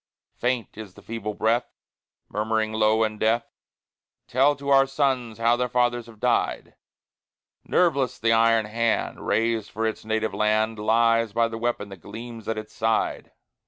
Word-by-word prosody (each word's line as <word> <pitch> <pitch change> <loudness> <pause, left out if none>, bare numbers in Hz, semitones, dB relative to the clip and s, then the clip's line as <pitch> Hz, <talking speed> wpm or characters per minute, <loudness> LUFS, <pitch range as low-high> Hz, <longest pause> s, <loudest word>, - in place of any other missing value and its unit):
Faint 125 -3 -2
is 100 -4 -9
the 100 - -14
feeble 105 -2 -5
breath, 115 +3 0 0.5
Murmuring 110 +1 -1
low 110 0 +3
in 110 -1 -2
death, 115 +2 +2 0.8
"Tell 135 +4 +3
to 140 0 -6
our 135 -1 +5
sons 130 -5 -1
how 115 +1 +3
their 125 0 -1
fathers 120 -1 +1
have 110 -2 -15
died;" - - 0 0.9
Nerveless 140 -8 +1
the 115 0 +2
iron 115 -1 +4
hand, 115 +2 -1
Raised 115 -2 0
for 110 +1 -3
its 110 - -3
native 110 0 -1
land, 110 +1 +1
Lies 115 0 +2
by 115 0 +2
the 115 0 -6
weapon 120 -3 -2
that 95 -3 -11
gleams 115 +2 -9
at 115 - -2
its 110 0 -7
side. 110 0 -1
115 Hz, 160 wpm, -25 LUFS, 110-120 Hz, 0.9 s, our